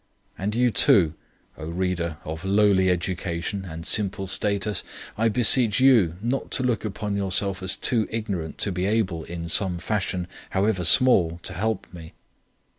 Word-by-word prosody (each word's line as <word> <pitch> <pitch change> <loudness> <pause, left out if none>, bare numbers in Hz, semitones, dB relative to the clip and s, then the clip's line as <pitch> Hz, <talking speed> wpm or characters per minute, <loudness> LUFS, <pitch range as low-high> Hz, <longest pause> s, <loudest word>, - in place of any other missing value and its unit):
And 105 +3 -3
you 125 0 +2
too, 85 -7 +4 0.5
O 80 - -6
reader 85 -2 -2
of 80 +2 -7
lowly 100 -1 +3
education 90 +2 -3
and 80 -2 -8
simple 100 -2 0
status, 100 0 -2 0.3
I 115 +1 +1
beseech 115 0 +4
you 115 -11 +4
not 125 +4 -2
to 130 - 0
look 120 -4 0
upon 105 0 -4
yourself 100 0 +1
as 95 0 0
too 115 -4 +1
ignorant 100 -8 -4
to 100 - -2
be 90 +1 -2
able 100 -7 -1
in 85 -1 -6
some 90 +1 +1
fashion, 95 -1 -2 0.2
however 95 -2 0
small, 85 - +4
to 95 - -5
help 105 +2 -2
me. 80 -2 -11
95 Hz, 155 wpm, -24 LUFS, 85-110 Hz, 0.5 s, too